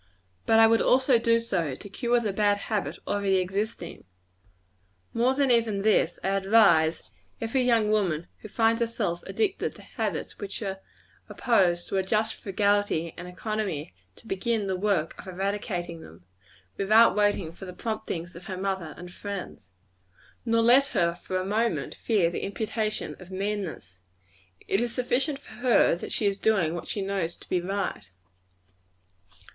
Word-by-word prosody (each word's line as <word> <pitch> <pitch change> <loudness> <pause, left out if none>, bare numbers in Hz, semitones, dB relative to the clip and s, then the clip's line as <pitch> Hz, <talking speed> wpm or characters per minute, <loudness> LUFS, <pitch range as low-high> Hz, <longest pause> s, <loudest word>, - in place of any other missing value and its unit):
But 225 - +5
I 225 - +8
would 225 0 +4
also 260 -1 +4
do 230 0 +3
so, 170 - -2
to 200 - -10
cure 240 +3 +1
the 215 -4 -2
bad 205 0 +2
habit 195 -7 -3
already 200 -1 +1
existing. 190 -1 -2 1.1
More 250 +3 +2
than 275 -2 +2
even 225 -4 +2
this; 185 -5 +3
I - - 0
advise 195 -5 +3 0.3
every 230 +4 0
young 230 -4 +3
woman 175 -7 +1
who - - -9
finds 225 +2 +2
herself 215 -7 -1
addicted 405 -3 -1
to - - -13
habits - - -4
which 200 -2 -5
are 195 -1 -4 0.5
opposed 175 -7 +2
to 195 - -2
a 190 - +2
just 215 +3 0
frugality 200 -4 0
and 175 - -8
economy, 185 - -3 0.2
to - - -18
begin 220 +1 -1
the 190 -1 -1
work 185 -4 0
of - - -10
eradicating 185 -3 -3
them, 90 - -14 0.5
without 215 +4 +5
waiting 205 -5 +1
for 185 +3 -10
the 180 - -7
promptings 180 -4 -4
of 175 +2 -11
her 185 - -5
mother 190 -5 -3
and 180 0 -10
friends. 195 - -7 0.8
Nor 230 0 +3
let 255 +4 +6
her, 170 -1 +3
for 180 +2 -4
a 185 - -2
moment, 220 +4 0
fear 195 -7 +1
the - - -4
imputation 215 +1 -2
of 180 -1 -12
meanness; 190 - -4 0.7
it 195 - +2
is 240 -1 -2
sufficient 260 +3 0
for 275 - -15
her 245 -1 +4
that 175 - -7
she 215 - -1
is 200 0 +1
doing 195 -8 +2
what 175 - -6
she 200 - -2
knows 190 -4 -2
to - - -16
be 180 - 0
right. 190 - -3
200 Hz, 160 wpm, -27 LUFS, 180-225 Hz, 1.1 s, I